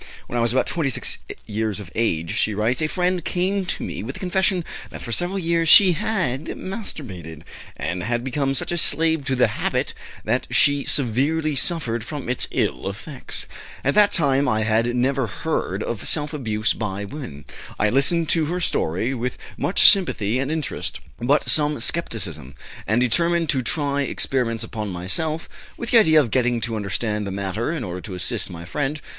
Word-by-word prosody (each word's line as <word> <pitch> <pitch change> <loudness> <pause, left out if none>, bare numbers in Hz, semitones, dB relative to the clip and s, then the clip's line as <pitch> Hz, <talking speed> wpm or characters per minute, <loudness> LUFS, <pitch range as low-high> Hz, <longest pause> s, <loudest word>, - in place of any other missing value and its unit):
"When - - -7
I 120 - +2
was 115 -1 +2
about 130 - +2
26 140 -7 0 0.3
years 110 -1 -2
of 100 -4 -9
age," 85 -8 0
she 110 - +1
writes, 115 +7 +1
"a 155 - +2
friend 180 +1 0
came 185 +2 0
to - - -2
me - - -4
with 120 +6 -5
the - - -8
confession 185 -1 +1 0.2
that - - -9
for 120 - -6
several 175 +9 0
years 165 -2 +1
she 190 +1 +9
had 180 - -1
masturbated, 100 - -7 0.3
and 90 0 -3
had 120 +4 -1
become 135 +1 0
such - - -2
a 175 - +1
slave 160 -1 +2
to 130 - +1
the 125 - +5 0.2
habit - - 0 0.3
that - - 0
she 145 -1 +3
severely 145 +5 +1
suffered 120 -4 0
from 145 +1 -6
its 125 - +1
ill 65 +10 -1
effects. 130 +8 -6 0.4
At 140 - +2
that 205 -1 +5
time 140 -3 +3
I 110 0 +1
had 115 +2 +1
never 130 0 +1
heard 85 -7 -2
of 115 -3 -4
self 150 0 0
abuse 110 -6 0
by 100 -2 -3
women. 100 - -8 0.3
I 105 - +2
listened 160 +5 +3
to 165 -2 +3
her 175 +4 -2
story 110 - 0
with 125 0 -3 0.2
much 185 - +4
sympathy 125 - 0
and 135 +1 -1
interest, 155 -2 -2 0.2
but 140 +5 +2
some 150 -2 +2
skepticism, 95 - -3 0.3
and 110 +3 +3
determined 170 +7 +2
to 135 - +2
try 140 +1 0
experiments 120 -3 0
upon 110 -2 -4
myself, 155 - -2 0.3
with 235 - -5
the 235 - +8
idea 160 -7 +6
of 125 -7 +1
getting 125 -1 +2
to 115 0 -2
understand 105 +1 -2
the - - -3
matter 100 - -2
in 160 -6 -3
order 90 -2 -5
to 95 -1 -7
assist 100 +5 -1
my 85 -1 -8
friend. 145 +10 -2
130 Hz, 185 wpm, -23 LUFS, 110-160 Hz, 0.4 s, she